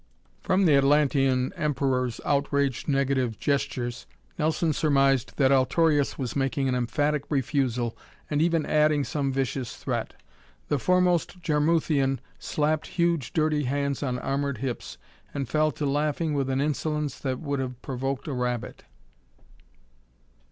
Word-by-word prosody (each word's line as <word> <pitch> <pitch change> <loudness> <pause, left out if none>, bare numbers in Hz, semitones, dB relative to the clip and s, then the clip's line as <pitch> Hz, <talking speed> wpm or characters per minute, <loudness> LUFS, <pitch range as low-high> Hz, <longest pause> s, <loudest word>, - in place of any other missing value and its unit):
From 190 0 +2
the 155 - +5
Atlantean 135 -2 +3
Emperor's 130 -5 -1
outraged 140 -2 0
negative 135 -5 +1
gestures, 135 -4 -2 0.3
Nelson 160 +1 +1
surmised 135 -4 +2
that 135 -2 +4
Altorius 145 +2 +2
was 130 -4 -4
making 135 0 0
an 130 - +1
emphatic 145 +4 0
refusal 125 -4 0 0.3
and 150 0 0
even 165 -2 +2
adding 150 -1 +3
some 140 -1 -1
vicious 130 -2 -2
threat. - - -3 0.5
The 145 - +1
foremost 180 +2 +2
Jarmuthian 150 -3 +2 0.2
slapped 155 +1 -1
huge 170 -5 0
dirty 155 -2 +1
hands 140 +1 -1
on 130 -3 -1
armored 140 +1 -2
hips 125 +1 -5 0.4
and 140 -3 -2
fell 155 +4 +2
to 150 - -3
laughing 150 +2 0
with 135 -2 0
an 135 +1 +1
insolence 150 0 -2
that 130 -2 -2
would 140 -3 -2
have 125 -2 -4
provoked 135 +2 -3
a 145 - -2
rabbit. 125 -2 -3
140 Hz, 130 wpm, -26 LUFS, 130-150 Hz, 0.5 s, the